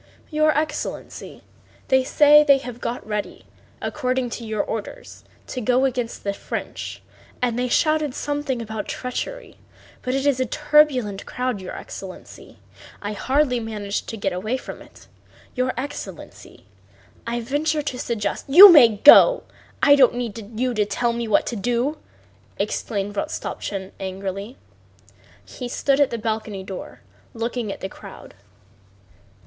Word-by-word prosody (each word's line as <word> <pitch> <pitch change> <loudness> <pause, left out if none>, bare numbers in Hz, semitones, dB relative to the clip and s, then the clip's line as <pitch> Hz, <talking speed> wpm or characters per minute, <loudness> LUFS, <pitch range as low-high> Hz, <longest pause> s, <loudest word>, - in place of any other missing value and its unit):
"Your 310 0 +3
excellency, 305 -1 -4 0.5
they 260 0 +4
say 295 +2 +6
they 280 -2 +5
have 245 -3 -8
got 240 - -4
ready, 210 -1 -5 0.4
according 255 -1 -1
to 235 - -6
your 215 -2 -2
orders, 350 - -7 0.2
to 255 - -5
go 250 +3 +2
against 245 -3 -3
the 200 - -1
French, - - -6 0.4
and 245 -1 0
they 250 - 0
shouted 310 +1 +1
something 290 -4 -2
about 220 -1 -5
treachery. - - -5 0.4
But 255 +1 -2
it 270 +1 -1
is 280 -3 +2
a 255 - 0
turbulent 295 -9 +2
crowd, 250 -5 -3
your 185 - -7
excellency—I 195 +2 -10
hardly 260 +3 +1
managed 210 -3 -4
to 225 - -5
get 195 -2 -2
away 215 +8 -2
from - - -9
it. - - -17 0.5
Your 255 0 0
excellency, 285 +3 -8 0.6
I 235 +1 -1
venture 295 +5 -1
to 255 -4 -4
suggest..." 210 -4 -3
"You 365 +8 +11
may 240 -9 +7
go. - - +8 0.4
I 285 -2 +7
don't 260 -3 +5
need 225 -2 -6
you 255 0 0
to 210 -2 +1
tell 235 +2 0
me 235 0 -3
what 215 - +3
to 240 - -4
do!" 245 +8 -1 0.6
exclaimed 205 -2 -3
Rostopchín 195 -1 -4
angrily. 195 +4 -5 0.9
He 250 -2 -7
stood 275 +2 +1
by 285 - +6
the 235 - -5
balcony 215 -3 -3
door 190 -1 -9 0.3
looking 230 -1 -3
at - - -8
the - - -3
crowd. - - -12
245 Hz, 145 wpm, -22 LUFS, 215-275 Hz, 0.9 s, You